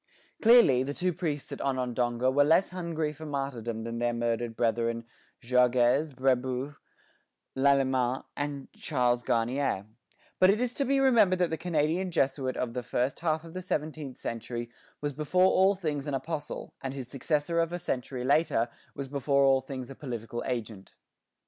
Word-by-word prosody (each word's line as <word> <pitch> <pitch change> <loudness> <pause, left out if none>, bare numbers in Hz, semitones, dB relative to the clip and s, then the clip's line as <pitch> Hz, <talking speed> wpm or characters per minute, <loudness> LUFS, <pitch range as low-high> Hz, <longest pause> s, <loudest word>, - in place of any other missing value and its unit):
Clearly, 225 - +7
the 140 +2 -3
two 180 0 0
priests 150 -4 -3
at - - -5
Onondaga 125 -1 0
were 145 +2 +4
less 165 +6 +4
hungry 165 -4 -3
for 155 +1 -9
martyrdom 120 -6 -3
than 115 0 -4
their 120 0 0
murdered 120 0 -1
brethren 115 0 0 0.4
Jogues, 125 +4 +3
Brébeuf, 130 +1 0 0.8
Lalemant, 130 -2 +2
and 145 -1 -4
Charles 120 -1 0
Garnier; 120 -3 0 0.5
but 185 - +6
it 205 +2 +3
is 250 0 -1
to 280 - -1
be 275 +1 +2
remembered 225 -9 +5
that 180 -2 +1
the - - +1
Canadian 165 +2 0
Jesuit 135 -5 0
of 120 -2 -2
the 125 - -2
first 125 +2 -1
half 160 -1 0
of 165 -1 -11
the 185 - -4
seventeenth 155 -5 -4
century 120 +1 -5 0.3
was 145 -1 -2
before 155 +6 +2
all 190 +2 +4
things 150 -6 -3
an 145 - -1
apostle, 150 +1 -5
and 135 0 -4
his 130 -3 -6
successor 150 +5 -1
of 165 0 +1
a 175 - -2
century 130 -6 -3
later 130 -4 +2 0.3
was 140 - -5
before 140 0 +1
all 135 -1 +4
things 130 -1 -7
a - - -6
political 120 -4 -5
agent. 110 -5 -5
135 Hz, 165 wpm, -29 LUFS, 125-160 Hz, 0.8 s, Clearly